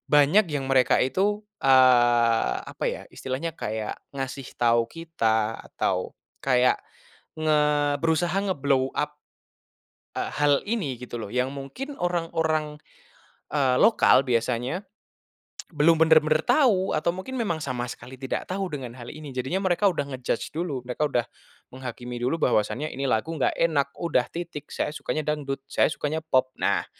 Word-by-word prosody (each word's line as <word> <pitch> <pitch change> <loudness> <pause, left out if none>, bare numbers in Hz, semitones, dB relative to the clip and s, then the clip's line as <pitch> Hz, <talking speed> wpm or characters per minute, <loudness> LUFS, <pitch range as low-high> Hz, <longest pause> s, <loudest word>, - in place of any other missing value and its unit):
banyak 150 +9 +6
yang 135 -2 -2
mereka 130 -2 +4
itu, 195 +11 +1 0.2
eee, 120 - +5
apa - - -6
ya, - - -2
Istilahnya 145 +5 -5
kayak, 110 0 -4 0.2
ngasih 135 -1 -5
tau 115 -1 +4
kita 115 -8 -1 0.2
atau - - -1 0.3
kayak, 125 -1 +4 0.6
nge 155 -1 +3 0.4
berusaha 165 +3 +1
ngeblow 140 -9 +1
up, 150 0 -2 1.0
eee, - - -2
hal 145 -1 +4
ini, 160 - -2
gitu 125 -1 -7
loh. 105 - -6
Yang 125 +1 0
mungkin 265 - -7
orang-orang, 160 - -1 0.8
eee, 135 -4 +2
lokal 135 - +5
biasanya 125 - 0 0.9
belum 160 +2 +4
bener-bener 155 -1 +5
tahu, 240 -8 +3
atau 155 +2 0
mungkin 190 +8 -7
memang 190 -8 0
sama 125 -2 -3
sekali 125 +2 -10
tidak 130 - -3
tahu 190 +1 -2
dengan 130 -5 -5
hal 120 -1 -9
ini. 150 -1 -9
Jadinya 130 +8 -1
mereka 185 +2 +3
udah 145 - -2
ngejudge 125 0 -3
dulu. 160 -6 -2
Mereka 130 +4 0
udah 120 -3 0 0.5
menghakimi 125 -1 -6
dulu, 130 +7 0
bahwasanya 125 +6 +1
ini 135 +1 -3
lagu 125 +9 0
nggak 145 - +1
enakm 145 -4 +1
udah 130 -7 +1
titik. 165 -4 -7
Saya 150 - -2
sukanya 155 0 -3
dangdut, 140 -3 -2
saya - - +3
sukanya 155 +1 -3
pop. 130 -4 +1
Nah, - - +1
140 Hz, 145 wpm, -25 LUFS, 125-165 Hz, 1.0 s, banyak